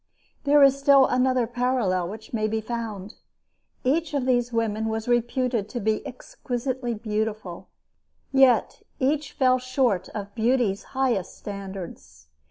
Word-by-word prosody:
There 290 0 +6
is 275 0 +5
still 275 -1 +6
another 255 -1 +2
parallel 240 -7 0
which 215 +4 -10
may 215 -1 0
be 220 +1 -1
found. 220 -3 -5 0.7
Each 300 +4 0
of 270 -3 0
these 245 -1 +1
women 220 -2 -1
was 220 +1 -3
reputed 240 -2 0
to 245 - -4
be 215 0 0
exquisitely 250 0 -4
beautiful; 210 -4 -4 0.6
yet 265 -4 +3 0.2
each 285 +2 0
fell 255 -1 +3
short 255 -6 0
of 200 -1 -7
beauty's 230 -3 +1 0.2
highest 245 -9 0
standards. 190 - -9
235 Hz, 130 wpm, -25 LUFS, 210-255 Hz, 0.7 s, There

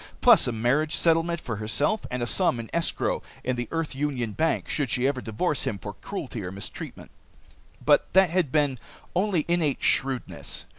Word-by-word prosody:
Plus - - +6
a - - +1
marriage 125 +8 +1
settlement 165 0 +2
for 115 -7 -5
herself, 145 - 0
and 125 -1 -2
a - - +1
sum 125 -1 +1
in 115 - -7
escrow 170 0 0 0.2
in 130 0 0
the 120 -1 -3
Earth 165 -2 -2
Union 135 -5 -2
bank, 160 +9 0
should 145 -5 -1
she 125 +3 +1
ever 135 -2 -1
divorce 120 +7 -1
him 100 - -1
for 105 +1 -7
cruelty 130 - -6
or 90 - -5
mistreatment. 100 +1 -7 0.7
But - - +4
that 190 -3 +5
had 175 -6 +1
been 145 -5 +1 0.4
only 185 -4 +1
innate 170 -5 +1
shrewdness. 135 -2 0
140 Hz, 180 wpm, -26 LUFS, 120-165 Hz, 0.7 s, Plus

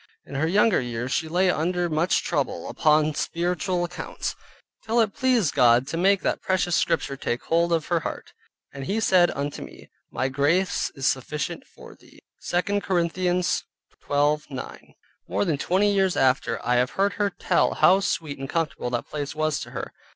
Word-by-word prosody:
In - - -12
her 145 +4 0
younger 210 +2 +3
years 120 +1 -4
she 160 +3 0
lay 180 +3 +2
under 175 +2 0
much 165 +2 +1
trouble 145 -5 -2
upon 155 0 +3
spiritual 175 +3 -1
accounts, 175 0 -5 0.5
till 225 +2 +1
it 220 -3 +2
pleased 255 - +2
God 125 -1 +5
to 165 - -3
make 195 +3 +3
that - - -1
precious 185 -2 +1
scripture 140 -4 0
take 120 -2 -3
hold 170 +1 +1
of 165 -2 +1
her 170 -2 +1
heart, - - -7 0.4
"And 135 -1 -6
he 210 +3 0
said 185 -5 +4
unto 140 +1 -4
me, - - -12 0.2
my 130 - -1
Grace 150 +8 +1
is 135 -2 -4
sufficient 140 +3 -2
for - - -14
thee" - - -21 0.3
(2 200 +3 0
Corinthians 180 0 0 0.4
12.9). 145 -2 -2 0.3
More - - 0
than 155 -6 -1
twenty 200 +6 +2
years 190 -2 +1
after, 130 -3 +2
I 125 0 +2
have 125 +1 +2
heard 200 +1 +2
her 205 - +2
tell - - +1
how 190 +2 +5
sweet 155 -7 -2
and 135 0 -6
comfortable 160 -6 -2
that 120 -1 -2
place 145 -1 -5
was 155 -1 0
to - - -7
her. - - -6
165 Hz, 175 wpm, -24 LUFS, 140-185 Hz, 0.5 s, God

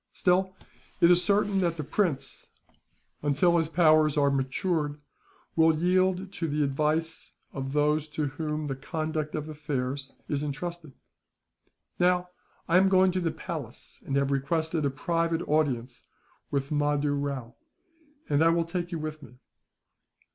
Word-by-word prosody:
Still, 185 +1 +1 0.4
it 170 - +6
is 180 0 +4
certain 200 -1 +2
that 170 -2 0
the 155 - -3
prince, 165 -2 -2 0.7
until 150 +4 +3
his 165 -2 0
powers 155 -3 +4
are 140 -1 +4
matured, 145 +3 -1 0.6
will 160 -1 +4
yield 185 +2 +1
to 165 - -2
the 150 0 0
advice 155 +3 -1 0.2
of 135 0 -4
those 150 +1 +2
to 150 0 -2
whom 150 +2 -3
the 135 -2 -3
conduct 155 +2 -3
of 155 0 -4
affairs 140 -3 -4 0.2
is 145 -1 -1
entrusted. 155 +1 -5 1.1
"Now, 180 0 +2 0.4
I 175 - +4
am 190 +1 +5
going 190 0 +5
to 185 - -1
the 170 - +1
palace, - - -7
and 135 - -3
have 140 0 +1
requested 160 +3 0
a - - +1
private 165 +4 -1
audience 130 -5 0 0.5
with 140 0 -2
Mahdoo 145 -1 +1
Rao, 140 -4 -3 0.7
and 145 +2 +3
I 165 - +5
will 165 0 +2
take 175 +1 -4
you 170 - -2
with 155 0 -5
me." 125 - -14
155 Hz, 145 wpm, -28 LUFS, 145-170 Hz, 1.1 s, it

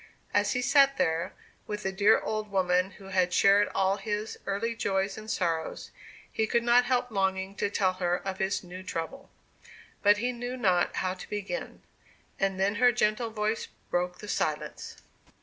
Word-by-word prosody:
As - - +2
he 250 -1 -1
sat 275 0 +5
there, 160 +1 0 0.3
with 210 0 -4
the 190 - -1
dear 205 +3 +4
old 215 -1 -3
woman 185 -1 +2
who 195 0 -12
had 185 -2 +2
shared 200 +2 +5
all 195 +1 +2
his 210 +2 -3
early 215 +4 -1
joys 195 -2 0
and 215 0 -9
sorrows, 165 -6 -2 0.4
he 220 - 0
could 235 +1 +1
not 240 +1 +5
help 245 -1 0
longing 190 -1 0
to 205 - 0
tell 190 -2 +1
her 180 -1 0
of 190 0 -5
his 190 +1 0
new 180 +1 -9
trouble. 185 +9 -5 0.7
But 205 0 +5
he 245 +4 0
knew 245 +1 -5
not 185 -7 +2
how 185 -1 -1
to 185 - -10
begin. 210 +5 -5 0.6
And 195 -1 0
then 195 +1 +2
her 245 0 +7
gentle 225 0 +1
voice 215 0 -2 0.2
broke 180 0 0
the 210 - -10
silence. - - -3
200 Hz, 175 wpm, -28 LUFS, 190-220 Hz, 0.7 s, her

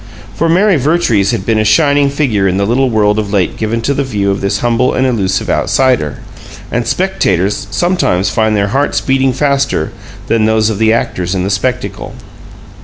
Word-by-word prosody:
For 165 - -1
Mary 190 +2 +3
Vertrees 130 - +1
had 105 -4 -2
been 110 -1 +1
a - - +2
shining 140 +6 +3
figure 125 -9 0
in 95 0 0
the 100 - 0
little 130 +5 +1
world 105 -2 +1
of 105 -2 -4
late 95 -4 0
given 115 +1 -2
to 140 +5 0
the 140 - -1
view 100 -6 -1
of 100 - -3
this 100 - 0
humble 120 +1 +1
and 130 - +1
elusive 95 -7 -1
outsider, 125 - +1 0.5
and 120 0 -2
spectators 100 - 0
sometimes 175 - 0
find 110 -1 +1
their 100 0 0
hearts 140 +7 0
beating 135 0 +1
faster 140 +1 0 0.3
than 115 -1 +1
those 110 0 +2
of 105 - -4
the 110 0 +3
actors 90 -5 -1
in 90 - -1
the 95 - -2
spectacle. 95 - -3
115 Hz, 185 wpm, -13 LUFS, 100-135 Hz, 0.5 s, Mary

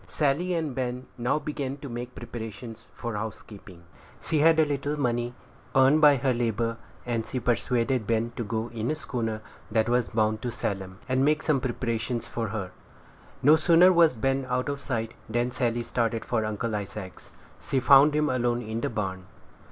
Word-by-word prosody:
Sally 160 +5 0
and 160 -5 -2
Ben 125 0 -3
now 120 +4 0
began 145 -2 -4
to 140 - -8
make 120 0 -6
preparations 115 0 -8
for 120 -1 -5
housekeeping. 105 -4 -8 0.4
She 155 - 0
had 160 +1 +5
a 160 - +5
little 145 +1 -2
money, 120 -2 -1 0.4
earned 135 +3 +5
by 145 -2 +8
her 130 0 +1
labor, 115 -1 -1 0.3
and 115 -2 -2
she 130 - -3
persuaded 120 -1 0
Ben 115 +1 0
to 120 - -3
go 110 +2 -3
in 115 0 -3
a 155 - 0
schooner 115 -7 -3 0.3
that 110 0 +1
was 120 0 +1
bound 110 -1 +1
to 120 - -3
Salem, 95 -4 -4
and 130 +1 +2
make 150 +2 +2
some 145 -4 +2
purchases 120 -1 -2
for 115 -1 -3
her. 100 -3 -4 0.7
No 150 +4 +8
sooner 170 +3 +6
was 165 -6 +5
Ben 135 +3 0
out 125 +3 0
of 140 0 -3
sight, 115 -4 -2 0.2
than 120 +2 0
Sally 120 -2 0
started 115 -1 -1
for 110 -3 0
Uncle 110 +1 -2
Isaac's. 100 -3 -7 0.2
She 135 - 0
found 140 +3 +6
him 150 0 +2
alone 120 -2 0
in 110 +1 -4
the - - -1
barn. 95 -5 -4
120 Hz, 180 wpm, -27 LUFS, 115-135 Hz, 0.7 s, by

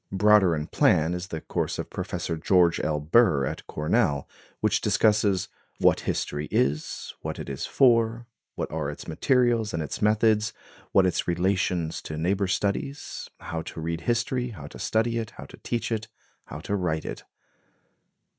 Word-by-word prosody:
Broader 100 -3 +5
in 75 0 -3
plan 80 +1 +3
is 90 0 -4
the 80 -3 -5
course - - -2
of - - -5
Professor 80 - -3
George 85 0 +3
L. 75 -1 0
Burr 80 - +4
at - - -5
Cornell, 75 -2 0 0.3
which 105 -1 +1
discusses 105 -2 +2 0.3
"what - - +4
history 75 +1 -2
is, 70 +4 -1
what - - -4
it - - -6
is 70 +3 -4
for, 115 -2 +3 0.3
what - - -4
are 75 -2 -2
its 75 - -8
materials 115 - +2
and 80 - -1
its 75 - -6
methods, 110 0 +3 0.4
what 95 - +5
its 90 - 0
relations 90 -2 0
to 75 - -6
neighbor 95 +5 +1
studies, 105 +9 -2
how 80 0 -4
to 80 - -8
read 80 +1 -3
history, 120 +4 0
how 85 -11 -9
to - - -10
study 115 +1 +1
it, 110 -2 -5
how - - -8
to - - -13
teach 120 0 -3
it, 110 0 -2 0.4
how 75 - -8
to 100 - -2
write 80 -5 -1
it." - - -6
95 Hz, 165 wpm, -26 LUFS, 80-110 Hz, 0.4 s, Broader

